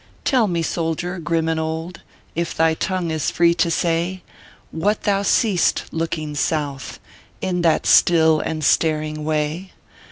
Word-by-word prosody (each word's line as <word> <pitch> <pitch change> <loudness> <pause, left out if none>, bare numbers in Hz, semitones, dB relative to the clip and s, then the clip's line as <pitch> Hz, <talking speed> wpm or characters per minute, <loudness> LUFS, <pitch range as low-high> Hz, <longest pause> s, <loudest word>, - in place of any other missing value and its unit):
Tell 250 -5 +3
me, 170 -3 -1
soldier, 170 +2 -2
grim 165 0 -1
and 160 -1 0
old, 160 +2 -4 0.3
If 170 +1 -3
thy 160 0 +3
tongue 180 0 -2
is 155 -2 -1
free 170 0 +3
to 170 0 +1
say, 170 +2 -1 0.5
What 205 +6 -1
thou 200 -1 +1
seest 200 -2 +2
looking 160 -2 -3
South, 145 -2 -3 0.4
In 180 -1 -1
that 165 -2 +2
still 160 -2 +5
and 155 0 -3
staring 155 0 +1
way? 155 +4 -2
165 Hz, 140 wpm, -21 LUFS, 160-175 Hz, 0.5 s, still